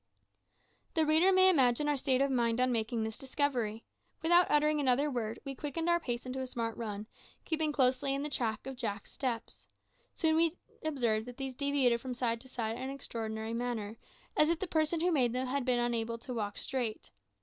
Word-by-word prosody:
The 320 -1 +4
reader 320 +5 +5
may 375 0 +6
imagine 275 -5 +4
our 295 - +2
state 265 -1 +2
of 275 0 +2
mind 235 -2 +1
on 255 0 +3
making 225 -1 0
this 220 -1 -5
discovery. 255 -5 -1 0.4
Without 345 +2 +5
uttering 300 0 +3
another 280 +2 +2
word, 225 -3 -2
we 275 - -4
quickened 295 +5 -3
our 345 0 +4
pace 240 -6 -3
into 255 +1 -4
a 260 - -3
smart 230 -3 -3
run, 210 -2 -5 0.4
keeping 315 -2 0
closely 270 0 +2
in 275 - -2
the - - -1
track 225 -5 -1
of 270 0 -5
Jack's 215 -4 -4
steps. 245 -4 -4 0.5
Soon 315 -1 +2
we 330 +1 +2 0.3
observed 240 -7 0
that 245 0 -9
these 270 -1 -4
deviated 265 -3 +2
from 255 -1 -5
side 230 -2 -1
to 260 - -14
side 230 -3 -3
in - - -7
an 260 - -3
extraordinary 225 -4 -4
manner, 230 -3 -3 0.4
as 305 - +4
if 335 - +2
the 385 - -2
person 315 -1 0
who 355 +1 +2
made 250 -7 +2
them 255 +1 -1
had 265 0 -1
been 250 -1 +2
unable 235 -1 -1
to 250 +2 -7
walk 205 -3 -3
straight. 245 -5 -3
255 Hz, 205 wpm, -32 LUFS, 230-295 Hz, 0.5 s, may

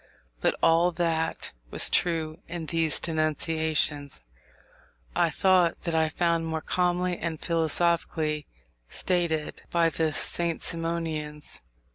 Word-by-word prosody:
But - - +1
all 165 +2 +5
that 165 -2 -1 0.2
was - - +3
true 160 -2 0
in 170 -1 -5
these 165 -1 0
denunciations, 155 -2 0 1.0
I 170 - +3
thought 185 0 +3
that 170 - -2
I 160 -1 +2
found 165 0 0
more 160 0 -2
calmly 180 0 0
and 160 -2 -3
philosophically 160 -2 0 0.4
stated 170 -4 -1
by 165 -1 +2
the 160 0 0
St. 170 +2 0
Simonians. 165 -3 -4
165 Hz, 110 wpm, -27 LUFS, 155-170 Hz, 1.0 s, all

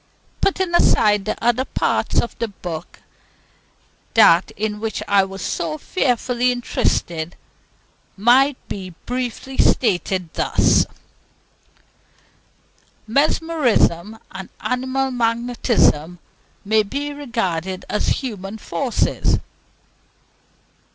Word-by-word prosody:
Putting 375 -2 +1
aside 210 -11 +4
the - - -2
other 240 +2 +2
parts - - 0
of 235 - -2
the 230 - 0
book, 175 -5 -8 1.1
that 180 -6 +6
in 210 0 -2
which 220 -1 -3
I 200 -1 +4
was 195 0 -6
so 160 -2 -2
fearfully 250 - 0
interested 175 -8 -1 0.8
might 255 +6 +4
be 185 -3 -7
briefly 250 +1 -4
stated 185 -5 +1
thus: - - +2 2.2
Mesmerism 245 - +1
and 190 0 -8
animal 260 +1 -1
magnetism 230 - +1 0.5
may 215 +2 +4
be 285 +7 -4
regarded 190 - -3
as 210 - -1
human 210 -5 -3
forces. 245 +3 0
225 Hz, 90 wpm, -21 LUFS, 190-255 Hz, 2.2 s, that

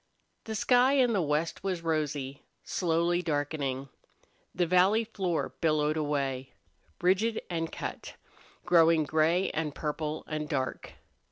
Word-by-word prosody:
The 220 - -4
sky 250 +4 +4
in 255 -4 +3
the 195 - +2
west 155 +1 -1
was 185 -3 -2
rosy, 145 -4 -2 0.2
slowly 175 0 +1
darkening. 145 -4 -2 0.7
The 180 - +2
valley 185 +6 +4
floor 190 -6 -2
billowed 155 -2 +2
away, 140 -4 -2 0.5
ridged 195 +6 +2
and 165 -1 -2
cut, - - -6 0.5
growing 165 -2 +5
gray 160 +5 +2
and 150 -2 -3
purple 155 0 -3
and 155 -1 -4
dark. 130 -4 -3
160 Hz, 120 wpm, -29 LUFS, 150-180 Hz, 0.7 s, growing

